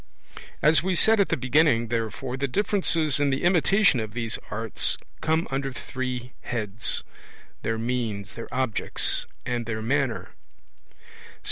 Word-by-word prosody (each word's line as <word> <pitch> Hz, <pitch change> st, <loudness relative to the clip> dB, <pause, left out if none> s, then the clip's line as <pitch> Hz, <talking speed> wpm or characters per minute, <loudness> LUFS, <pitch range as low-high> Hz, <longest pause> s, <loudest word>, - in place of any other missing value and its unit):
As 155 Hz, +2 st, +6 dB
we 185 Hz, +2 st, 0 dB
said 220 Hz, +4 st, +6 dB
at 200 Hz, -, +3 dB
the -, -, +1 dB
beginning, 130 Hz, -3 st, +3 dB
therefore, 120 Hz, +3 st, -2 dB
the 135 Hz, +1 st, -1 dB
differences 165 Hz, -4 st, +2 dB
in 145 Hz, -1 st, +3 dB
the 135 Hz, 0 st, -1 dB
imitation 175 Hz, -, +4 dB
of 110 Hz, 0 st, -5 dB
these 115 Hz, -2 st, -2 dB
arts 115 Hz, +1 st, 0 dB, 0.2 s
come 160 Hz, +1 st, +1 dB
under 135 Hz, 0 st, -1 dB
three 125 Hz, -1 st, -5 dB
heads, 110 Hz, -3 st, -2 dB, 0.6 s
their 115 Hz, 0 st, -1 dB
means, 115 Hz, -3 st, -2 dB
their 115 Hz, -, -8 dB
objects, 130 Hz, -3 st, -1 dB, 0.2 s
and 120 Hz, -2 st, -2 dB
their 110 Hz, -1 st, -2 dB
manner. 135 Hz, 0 st, 0 dB
130 Hz, 135 wpm, -26 LUFS, 115-150 Hz, 0.6 s, As